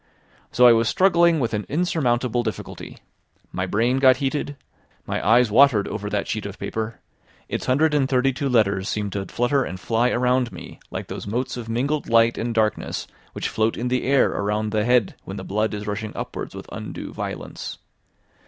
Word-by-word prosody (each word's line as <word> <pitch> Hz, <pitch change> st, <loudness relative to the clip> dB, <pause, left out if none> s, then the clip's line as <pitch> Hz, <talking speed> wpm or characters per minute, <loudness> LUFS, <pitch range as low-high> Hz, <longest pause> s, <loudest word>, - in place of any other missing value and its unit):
So 125 Hz, -, +5 dB
I 120 Hz, -, +9 dB
was 115 Hz, -1 st, +2 dB
struggling 170 Hz, -3 st, +4 dB
with 120 Hz, -4 st, -1 dB
an 105 Hz, 0 st, -1 dB
insurmountable 125 Hz, -7 st, +1 dB
difficulty; 110 Hz, -3 st, -6 dB, 0.5 s
my 95 Hz, -, -2 dB
brain 120 Hz, +7 st, +1 dB
got 130 Hz, -2 st, +6 dB
heated, 145 Hz, +1 st, -2 dB, 0.5 s
my -, -, -3 dB
eyes 115 Hz, +2 st, +4 dB
watered 120 Hz, -3 st, +5 dB
over 105 Hz, -1 st, -4 dB
that 105 Hz, -1 st, -2 dB
sheet 110 Hz, -2 st, -3 dB
of 100 Hz, -, -9 dB
paper; 110 Hz, +1 st, -4 dB, 0.5 s
its -, -, -4 dB
hundred 150 Hz, +4 st, +3 dB
and 140 Hz, -3 st, +2 dB
thirty 135 Hz, 0 st, +2 dB
two 140 Hz, +1 st, -2 dB
letters 100 Hz, -5 st, +2 dB
seemed 105 Hz, -2 st, -2 dB
to 95 Hz, 0 st, -4 dB
flutter 130 Hz, +3 st, +1 dB
and 95 Hz, -, -6 dB
fly 115 Hz, +6 st, +1 dB
around 125 Hz, 0 st, +1 dB
me -, -, -10 dB
like -, -, -5 dB
those -, -, -7 dB
motes 125 Hz, +4 st, -2 dB
of 120 Hz, -2 st, -7 dB
mingled 140 Hz, +6 st, -1 dB
light 115 Hz, 0 st, +4 dB
and 115 Hz, 0 st, -3 dB
darkness 110 Hz, -2 st, 0 dB, 0.3 s
which -, -, -3 dB
float 110 Hz, +1 st, 0 dB
in 125 Hz, +1 st, -2 dB
the 125 Hz, 0 st, 0 dB
air 135 Hz, +1 st, +3 dB
around 105 Hz, +1 st, -1 dB
the 105 Hz, 0 st, +1 dB
head 125 Hz, -4 st, +3 dB
when -, -, -7 dB
the -, -, -6 dB
blood 110 Hz, +2 st, -1 dB
is 105 Hz, 0 st, -5 dB
rushing 105 Hz, +1 st, -4 dB
upwards -, -, -6 dB
with -, -, -8 dB
undue -, -, -7 dB
violence. -, -, -6 dB
120 Hz, 190 wpm, -23 LUFS, 110-130 Hz, 0.5 s, I